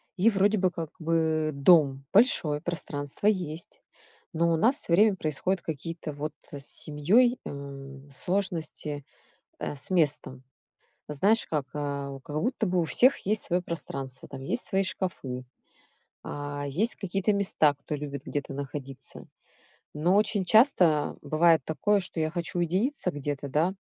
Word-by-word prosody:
И 205 Hz, +5 st, +4 dB
вроде 205 Hz, 0 st, +2 dB
бы 185 Hz, -1 st, +3 dB
как 165 Hz, -3 st, -6 dB
бы 160 Hz, -1 st, +1 dB
дом 140 Hz, -3 st, +4 dB
большой, 165 Hz, -, +4 dB
пространство 145 Hz, -2 st, -5 dB
есть, 175 Hz, -6 st, -1 dB, 0.5 s
но 170 Hz, -1 st, +2 dB
у -, -, +2 dB
нас 230 Hz, -, +3 dB
всё 170 Hz, -, -3 dB
время 210 Hz, +2 st, +5 dB
происходят 175 Hz, +3 st, -1 dB
какие-то 160 Hz, 0 st, -5 dB
вот 150 Hz, +1 st, -4 dB, 0.2 s
с 140 Hz, -1 st, -6 dB
семьей, 210 Hz, -, +3 dB
эм, 140 Hz, -1 st, -8 dB
сложности, 160 Hz, -3 st, -2 dB, 0.6 s
э, -, -, -3 dB
с 135 Hz, -, -1 dB
местом. 150 Hz, -7 st, 0 dB, 0.7 s
Знаешь, 200 Hz, +10 st, +2 dB
как, 150 Hz, -4 st, -2 dB
а, 140 Hz, -1 st, -3 dB
как 150 Hz, -, -6 dB
будто 235 Hz, +2 st, 0 dB
бы 180 Hz, -1 st, +1 dB
у -, -, +1 dB
всех 255 Hz, -, +4 dB
есть 215 Hz, +1 st, 0 dB
свое 180 Hz, 0 st, 0 dB
пространство, 135 Hz, -6 st, -5 dB
там, 135 Hz, -1 st, -8 dB
есть 240 Hz, -, -2 dB
свои 195 Hz, -1 st, +1 dB
шкафы, 135 Hz, -10 st, -4 dB, 0.8 s
а, 145 Hz, 0 st, -5 dB
есть 195 Hz, -, +1 dB
какие-то 195 Hz, +2 st, 0 dB
места, 185 Hz, -7 st, +2 dB
кто 145 Hz, +2 st, -7 dB
любит 140 Hz, -2 st, -6 dB
где-то 145 Hz, -1 st, -4 dB
находиться. 135 Hz, -1 st, -6 dB, 0.7 s
Но 170 Hz, +6 st, +2 dB
очень 205 Hz, -2 st, +2 dB
часто 180 Hz, -, +4 dB
бывает 160 Hz, +1 st, +4 dB
такое, 205 Hz, +6 st, +1 dB
что 180 Hz, -2 st, -6 dB
я 155 Hz, 0 st, +1 dB
хочу 175 Hz, +1 st, -3 dB
уединиться 185 Hz, -, 0 dB
где-то, 145 Hz, 0 st, -4 dB
да. 160 Hz, +7 st, +1 dB
160 Hz, 145 wpm, -28 LUFS, 145-190 Hz, 0.8 s, время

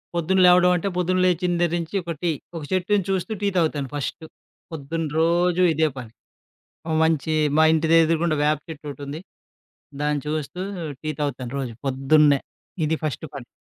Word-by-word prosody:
పొద్దున 175 Hz, +3 st, +1 dB
లేవడం 180 Hz, 0 st, +6 dB
అంటే 180 Hz, +3 st, -2 dB
పొద్దున 185 Hz, +1 st, +1 dB
లేచి 180 Hz, 0 st, +1 dB
దెగ్గర 175 Hz, -1 st, +1 dB
నుంచి 165 Hz, +3 st, -6 dB
ఒక 170 Hz, -, -4 dB
టి. 170 Hz, -2 st, +1 dB, 0.2 s
ఒక 165 Hz, -, -5 dB
చెట్టుని 185 Hz, +1 st, +1 dB
చూస్తూ 190 Hz, +3 st, -1 dB
టీ 205 Hz, -, +1 dB
తాగుతాను 150 Hz, -5 st, 0 dB
ఫస్టు. 145 Hz, +3 st, -4 dB, 0.5 s
పొద్దున్న 160 Hz, +2 st, -4 dB
రోజు 175 Hz, +2 st, +2 dB
ఇదే 155 Hz, +1 st, +2 dB
పని. 120 Hz, -4 st, -8 dB, 0.8 s
ఓ -, -, -2 dB
మంచి 160 Hz, -1 st, 0 dB, 0.2 s
మా 160 Hz, -, +6 dB
ఇంటెదురుగుండా 165 Hz, 0 st, +3 dB
వేప 150 Hz, 0 st, +2 dB
చెట్టొకటుంది. 145 Hz, -1 st, -7 dB, 0.8 s
దాన్ని 150 Hz, -1 st, 0 dB
చూస్తూ 155 Hz, +3 st, -4 dB, 0.4 s
టీ 155 Hz, -, -2 dB
తాగుతాను 135 Hz, -4 st, -3 dB
రోజు 125 Hz, -4 st, -4 dB
పొద్దున్నే. 140 Hz, +2 st, +3 dB, 0.4 s
ఇది 155 Hz, -, +1 dB
ఫస్టు 155 Hz, +1 st, -3 dB
పని. 130 Hz, -4 st, -8 dB
160 Hz, 150 wpm, -23 LUFS, 145-175 Hz, 0.8 s, లేవడం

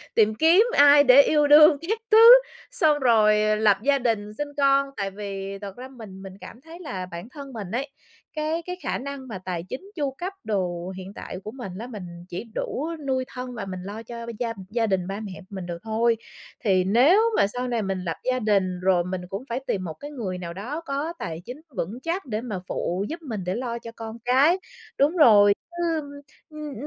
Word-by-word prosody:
tìm 215 Hz, -1 st, +4 dB
kiếm 325 Hz, -, +5 dB, 0.2 s
ai 285 Hz, 0 st, +8 dB
để 270 Hz, 0 st, +8 dB
yêu 295 Hz, 0 st, +3 dB
đương 300 Hz, +1 st, +8 dB
các 445 Hz, +1 st, 0 dB
thứ, 435 Hz, -, +7 dB, 0.5 s
xong 315 Hz, -12 st, +2 dB
rồi 215 Hz, -4 st, +4 dB
lập 210 Hz, -2 st, +4 dB
gia 280 Hz, +1 st, +3 dB
đình 215 Hz, -4 st, -1 dB
sinh 295 Hz, +7 st, -4 dB
con. 275 Hz, 0 st, +3 dB
Tại 195 Hz, -1 st, -2 dB
vì 195 Hz, -1 st, -6 dB
thật 200 Hz, -1 st, -8 dB
ra 255 Hz, -, -8 dB
mình 220 Hz, -7 st, -11 dB
mình 190 Hz, -1 st, -9 dB
cảm 235 Hz, -, -11 dB
thấy 330 Hz, +3 st, -12 dB
là 195 Hz, -, -5 dB
bản 170 Hz, +7 st, -8 dB
thân 275 Hz, -1 st, -10 dB
mình 205 Hz, -5 st, -6 dB
ấy, 265 Hz, +4 st, -2 dB, 0.5 s
cái 310 Hz, +2 st, -1 dB
cái 360 Hz, -, -4 dB
khả -, -, -1 dB
năng 275 Hz, 0 st, -7 dB
mà 215 Hz, -, -6 dB
tài 175 Hz, -3 st, -3 dB
chính, 380 Hz, +10 st, -7 dB
chu 285 Hz, -5 st, -1 dB
cấp 360 Hz, +8 st, -6 dB
đồ 180 Hz, -3 st, -2 dB
hiện 190 Hz, +1 st, -8 dB
tại -, -, -7 dB
của 215 Hz, -, -6 dB
mình 240 Hz, -6 st, -8 dB
lá, 225 Hz, +5 st, -6 dB
mình 215 Hz, -6 st, -8 dB, 0.3 s
chỉ 175 Hz, -, -5 dB
đủ 295 Hz, -, -3 dB, 0.2 s
nuôi 260 Hz, -1 st, 0 dB
thân 250 Hz, 0 st, -7 dB
và 215 Hz, -, -5 dB
mình 185 Hz, -1 st, -6 dB
lo 205 Hz, +4 st, -7 dB
cho 235 Hz, 0 st, -8 dB
b -, -, -7 dB
gia 235 Hz, -2 st, -1 dB, 0.2 s
gia 225 Hz, +1 st, 0 dB
đình, 190 Hz, -3 st, 0 dB
ba 195 Hz, +1 st, -4 dB
mẹ 200 Hz, -3 st, -7 dB, 0.2 s
mình 190 Hz, -3 st, -6 dB
được 175 Hz, -1 st, -5 dB
thôi. 225 Hz, +1 st, +1 dB, 0.5 s
Thì 190 Hz, -4 st, +3 dB
nếu 250 Hz, -, +5 dB, 0.2 s
mà -, -, +4 dB
sau 250 Hz, +5 st, -4 dB
này 235 Hz, -3 st, -1 dB
mình 195 Hz, -1 st, -2 dB
lập 165 Hz, -2 st, -3 dB
gia 255 Hz, -, 0 dB
đình 195 Hz, -5 st, +1 dB
rồi 185 Hz, -2 st, +3 dB
mình 180 Hz, +1 st, -4 dB
cũng 195 Hz, +5 st, -5 dB
phải 235 Hz, +2 st, -2 dB
tìm 190 Hz, -, -1 dB
một 165 Hz, -3 st, -5 dB
cái 290 Hz, -, -10 dB
người 205 Hz, -10 st, -4 dB
nào 170 Hz, -1 st, -6 dB
đó 250 Hz, -, -5 dB
có 290 Hz, +4 st, -3 dB
tài 165 Hz, +1 st, -5 dB
chính 255 Hz, +5 st, -8 dB, 0.2 s
vững 205 Hz, +9 st, -3 dB
chắc 345 Hz, +2 st, -2 dB
để 220 Hz, -3 st, -3 dB
mà 210 Hz, -7 st, -4 dB
phụ 185 Hz, +4 st, -2 dB
giúp 335 Hz, +2 st, -6 dB
mình, 225 Hz, -, -5 dB
để 180 Hz, +1 st, -2 dB
lo 235 Hz, -1 st, -3 dB
cho 230 Hz, -1 st, -9 dB
con 225 Hz, 0 st, -7 dB
cái. 275 Hz, +8 st, +4 dB, 0.4 s
Đúng 300 Hz, +6 st, +2 dB
rồi, 205 Hz, -9 st, +7 dB, 0.2 s
chứ 345 Hz, 0 st, -4 dB, 0.2 s
ưm, 285 Hz, -2 st, -8 dB, 0.4 s
ưm, 305 Hz, -2 st, -7 dB
230 Hz, 225 wpm, -24 LUFS, 195-280 Hz, 0.5 s, ai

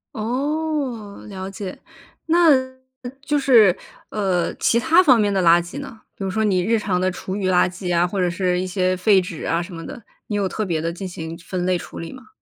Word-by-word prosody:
哦， 260 Hz, -2 st, -3 dB
了 190 Hz, -2 st, -6 dB
解。 195 Hz, -1 st, -7 dB, 0.5 s
那 335 Hz, 0 st, +5 dB, 0.7 s
就 295 Hz, +1 st, 0 dB
是， 225 Hz, -9 st, +5 dB, 0.3 s
呃， 190 Hz, -5 st, 0 dB
其 235 Hz, -, +2 dB
它 325 Hz, +7 st, +5 dB
方 255 Hz, -8 st, +5 dB
面 205 Hz, -1 st, +2 dB
的 190 Hz, -, +1 dB
垃 170 Hz, 0 st, +6 dB
圾 175 Hz, +11 st, -8 dB
呢？ 230 Hz, -6 st, -9 dB
比 -, -, -7 dB
如 190 Hz, -, -2 dB
说 220 Hz, +3 st, 0 dB
你 190 Hz, -4 st, +2 dB
日 225 Hz, +4 st, +2 dB
常 190 Hz, -3 st, -1 dB
的 185 Hz, +1 st, +1 dB
厨 185 Hz, +1 st, -6 dB
余 195 Hz, -2 st, -1 dB
垃 180 Hz, 0 st, +3 dB
圾 180 Hz, -1 st, -3 dB
啊， 175 Hz, +1 st, +3 dB
或 195 Hz, +2 st, -4 dB
者 180 Hz, -1 st, +2 dB
是 180 Hz, 0 st, 0 dB
一 185 Hz, -, -2 dB
些 185 Hz, 0 st, 0 dB
废 195 Hz, +1 st, +4 dB
纸 175 Hz, -3 st, -7 dB
啊， 165 Hz, +1 st, 0 dB
什 175 Hz, +1 st, -8 dB
么 165 Hz, -1 st, -7 dB
的， 235 Hz, -, -9 dB, 0.2 s
你 210 Hz, -, -3 dB
有 200 Hz, -2 st, +1 dB
特 215 Hz, -, -3 dB
别 165 Hz, -4 st, -1 dB
地 165 Hz, -, -2 dB
进 185 Hz, +3 st, -6 dB
行 165 Hz, -2 st, -7 dB
分 180 Hz, +1 st, -4 dB
类 185 Hz, 0 st, +2 dB
处 -, -, -9 dB
理 165 Hz, -, -7 dB
吗？ 260 Hz, -1 st, -13 dB
190 Hz, 240 characters per minute, -21 LUFS, 180-225 Hz, 0.7 s, 垃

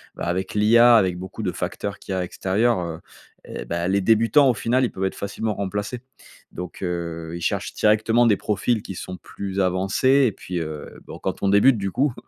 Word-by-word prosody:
bah, -, -, -5 dB
avec 95 Hz, +4 st, -2 dB
l'IA, 115 Hz, +3 st, +6 dB
avec 95 Hz, -5 st, +3 dB
beaucoup 95 Hz, +4 st, -7 dB
de 90 Hz, -, 0 dB
facteurs 100 Hz, 0 st, -4 dB
qu'il -, -, -9 dB
y -, -, -1 dB
a, 90 Hz, -, -1 dB
extérieurs, 100 Hz, +5 st, 0 dB
heu, 85 Hz, -2 st, -5 dB, 0.5 s
et -, -, -7 dB
bah, 85 Hz, +1 st, -2 dB
les 100 Hz, +1 st, +2 dB
débutants 115 Hz, +7 st, +4 dB
au -, -, +3 dB
final, 125 Hz, +4 st, +1 dB
ils 120 Hz, -, +1 dB
peuvent 95 Hz, +1 st, -3 dB
être 95 Hz, -, -2 dB
facilement 105 Hz, +2 st, -3 dB
remplacés 105 Hz, +5 st, -4 dB, 0.5 s
donc, 90 Hz, 0 st, -8 dB
heu, 85 Hz, -2 st, -4 dB
ils 85 Hz, -, -5 dB
cherchent -, -, -2 dB
directement 110 Hz, +3 st, +3 dB
des 105 Hz, -, +4 dB
profils 105 Hz, +2 st, 0 dB
qui 95 Hz, -, -7 dB
sont 90 Hz, -, -6 dB
plus 100 Hz, -1 st, -6 dB
avancés 95 Hz, +9 st, +2 dB
et -, -, 0 dB
puis, 90 Hz, -1 st, -5 dB
heu, 75 Hz, -2 st, -7 dB
bon, -, -, -9 dB
quand -, -, -4 dB
on -, -, +2 dB
débute, 110 Hz, +5 st, +5 dB
du 95 Hz, 0 st, -2 dB
coup 135 Hz, +4 st, +1 dB
100 Hz, 210 wpm, -23 LUFS, 90-115 Hz, 0.5 s, l'IA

